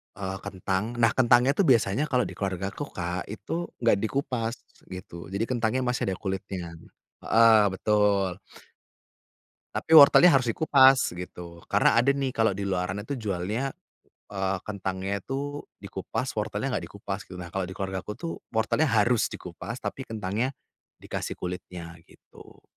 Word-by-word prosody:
eee, 95 -1 -4
kentang 100 +3 -2
nah 115 -1 +5
kentang 120 -1 +5
itu 145 - +2
biasanya 115 +1 +3
kalau 125 -3 +2
di - - -5
keluargaku 95 +5 -3
Kak, 90 0 -3
itu 110 - -4 0.2
enggak 115 -4 +4
dikupas 115 -1 -2 0.3
gitu, 90 -2 -9
jadi 100 +3 0
kentangnya 120 0 0
masih 125 0 -1
ada 95 - -1
kulitnya 95 -3 -4 0.5
heeh 115 -1 +6
betul. 100 -2 +1 1.4
Tapi - - -4
wortelnya 155 +4 +9
harus 130 -4 +3
dikupas, 135 - +5
gitu. 85 -1 -9
Karena 115 - +4
ada 135 +4 +4
nih 135 -2 -1
kalau 110 -2 +2
di 100 - -4
luaran 95 +1 -2
itu 140 +6 -4
jualnya, 105 +6 -2 0.6
eee, 95 -1 -1
kentangnya 95 -1 -3
itu 145 +5 -4
dikupas, 100 +5 -4
wortelnya 105 +5 -2
enggak - - -3
dikupas, 100 -1 -5
gitu. 90 - -10
Nah, 85 -1 -8
kalau 95 -1 -2
di 95 - -8
keluargaku 95 +1 -4
tuh 165 +5 -4 0.2
wortelnya 115 +8 +2
harus 115 0 +3
dikupas 95 +7 -8
tapi 135 - -5
kentangnya 110 +3 -2 0.5
dikasih - - -4
kulitnya, 90 -1 -6 0.2
gitu. - - -18
105 Hz, 145 wpm, -27 LUFS, 95-125 Hz, 1.4 s, wortelnya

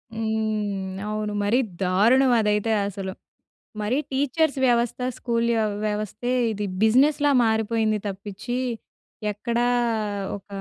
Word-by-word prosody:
హ్మ్ 215 -3 -2
అవును. 215 0 -2
మరి 215 +5 +3 0.2
దారుణం 230 +9 +4
అదైతే 210 +1 +1 0.2
అసలు. 195 -1 -5 0.7
మరి 215 +5 0
టీచర్స్ 280 +2 +1
వ్యవస్థ 240 0 +1 0.2
స్కూల్ 235 -1 0
య - - +2 0.3
వ్యవస్థే 215 +3 -3 0.2
ఇది 210 -1 -3 0.2
బిజినెస్‌లా 285 +6 +4
మారిపోయింది 220 -1 +1
తప్పించి 200 +5 -5 0.7
ఎక్కడా 235 +3 -1 0.7
ఒక 195 - -19
220 Hz, 100 wpm, -24 LUFS, 210-240 Hz, 0.7 s, దారుణం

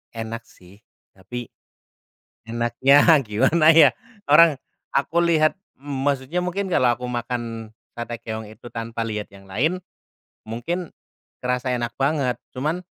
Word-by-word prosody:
Enak 115 0 -6
sih. 95 +3 -19 0.3
Tapi, 120 +6 -8 1.0
enaknya 120 +5 +3 0.2
gimana 135 +10 +4
ya, 155 -3 +8 0.4
orang, 155 +1 +7 0.4
aku 140 +4 0
lihat, 155 -2 +3 0.2
maksudnya 140 +2 -2
mungkin 190 +2 -2
kalau 125 -7 +4
aku 125 - -7
makan 120 -2 -4 0.2
sate 120 0 -5
keong 110 0 -5
itu 110 +3 -13
tanpa 115 0 -5
lihat 105 -2 -4
yang 100 0 -15
lain, 155 - 0 0.7
mungkin, 165 +11 -4 0.5
kerasa 125 0 -1
enak 120 -1 -3
banget. 135 -3 +1 0.2
Cuman, 155 +7 -1
125 Hz, 120 wpm, -23 LUFS, 115-150 Hz, 1.0 s, ya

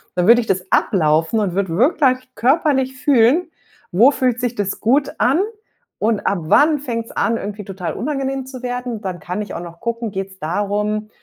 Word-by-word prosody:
Dann 180 -1 +1
würde 240 +2 +7
ich 225 - -8
das 185 -1 0
ablaufen 165 +1 +2
und 200 -4 -1
würde 185 -3 -1
wirklich 255 - +2
körperlich 265 -1 +1
fühlen, 275 +5 +3 0.4
wo 215 +9 +6
fühlt 250 -3 0
sich 245 -1 -2
das 200 -2 -2
gut 270 +5 +1
an 270 +7 +3 0.6
und 215 -1 +1
ab 200 - 0
wann 295 - +4
fängt's 230 -4 -4
an, 230 0 0
irgendwie 210 0 -6
total 190 -3 -5
unangenehm 270 -1 -3
zu 260 -1 -9
werden? 245 -3 -4
Dann 185 -4 -5
kann 180 +4 -4
ich 210 - -9
auch - - -4
noch 170 -1 -11
gucken, 235 -1 -3
geht's 190 0 -6
darum, 205 +5 -2
230 Hz, 180 wpm, -19 LUFS, 195-260 Hz, 0.6 s, würde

